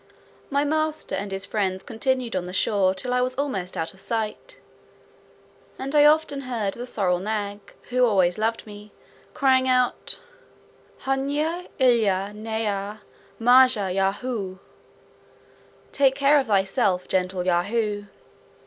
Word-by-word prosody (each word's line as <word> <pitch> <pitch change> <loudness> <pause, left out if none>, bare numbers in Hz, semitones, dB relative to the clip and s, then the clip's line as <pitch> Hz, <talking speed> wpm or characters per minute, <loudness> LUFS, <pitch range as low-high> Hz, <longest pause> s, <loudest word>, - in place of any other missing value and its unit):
My 280 +1 +1
master 310 +1 -1
and 200 0 -3
his 195 +1 -3
friends 190 -3 -2
continued 250 -1 -2
on 180 -1 -1
the 180 - -7
shore 190 -1 +1
till 250 +6 -3
I 250 - +2
was 255 +1 -1
almost 205 -11 -3
out 165 - -3
of 190 - -16
sight; 215 +2 -4 1.2
and 270 +2 -5
I 295 -1 +6
often 300 -2 +3
heard 230 -7 -2
the 245 +1 -7
sorrel 180 -6 0
nag 205 0 -3 0.3
(who 250 0 +3
always 190 -5 +3
loved 225 +1 -1
me) 210 0 -12 0.4
crying 260 -3 +3
out, 255 -1 +2 0.9
"Hnuy 290 +6 -1
illa 215 -7 +2
nyha, 210 -1 -3 0.4
majah 245 -5 +5
Yahoo;" 195 0 -2 1.3
"Take 270 -2 +3
care 285 +1 +4
of 270 - -2
thyself, 195 -2 +1
gentle 185 -1 -1
Yahoo." 205 +4 0
220 Hz, 130 wpm, -24 LUFS, 195-260 Hz, 1.3 s, I